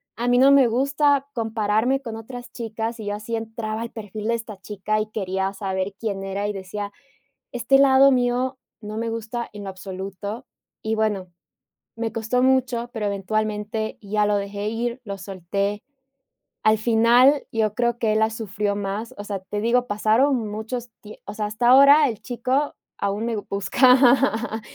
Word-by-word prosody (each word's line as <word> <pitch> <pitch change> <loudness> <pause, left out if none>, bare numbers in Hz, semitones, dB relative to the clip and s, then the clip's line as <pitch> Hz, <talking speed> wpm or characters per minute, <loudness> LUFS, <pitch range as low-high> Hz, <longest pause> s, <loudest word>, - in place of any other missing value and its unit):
a 240 +2 -3
mí 245 - +4
no 275 +1 +7
me 275 -2 +7
gusta 280 +3 +2
compararme 225 +3 0
con 230 -4 -6
otras 245 +2 -9
chicas", 225 0 -4
y 215 - -6
yo 205 - -1
así 215 +2 -4
entraba 225 0 -4
al 235 - -7
perfil 215 0 -6
de - - +3
esta 220 -3 -7
chica 210 +2 -2
y 215 0 -6
quería 190 -1 -2
saber 190 -1 -3
quién 200 -4 -3
era 200 +1 -2
y 210 - -2
decía: 200 +2 -5 0.6
"Este 245 +3 +3
lado 275 0 +6
mío, 250 +1 +1 0.2
no 210 +1 -6
me 230 0 -2
gusta 230 +1 -4
en 205 -1 -8
lo - - -4
absoluto", 195 +5 -7 0.4
y 220 0 0
bueno, 210 -4 0 0.7
me 225 -1 -3
costó 230 +3 0
mucho, 255 -2 +1
pero 215 -2 -3
eventualmente 215 +2 -2
ya 210 +1 +1
lo 205 0 +2
dejé 200 +1 -3
ir, 235 +3 -3
lo 200 -1 -6
solté, 195 +2 -3 0.8
al 215 0 +4
final, 240 +5 +4
yo 215 -2 0
creo 240 0 0
que 220 -3 +1
él, 220 - +2
la 220 0 +3
sufrió 210 -2 -2
más, 205 +3 -4
o 205 - -6
sea, 200 -2 -4
te 205 +2 -5
digo, 245 +2 +2
pasaron 220 +3 +2
muchos 230 +3 -5
tie 210 0 -12
o 205 - -6
sea, 210 -1 -2
hasta 220 +3 -1
ahora 280 +3 +7
el 220 -4 -6
chico 255 +4 -1 0.3
aún 200 +3 -1
me 230 -2 -1
busca, 240 +2 +3
220 Hz, 175 wpm, -23 LUFS, 205-245 Hz, 0.8 s, no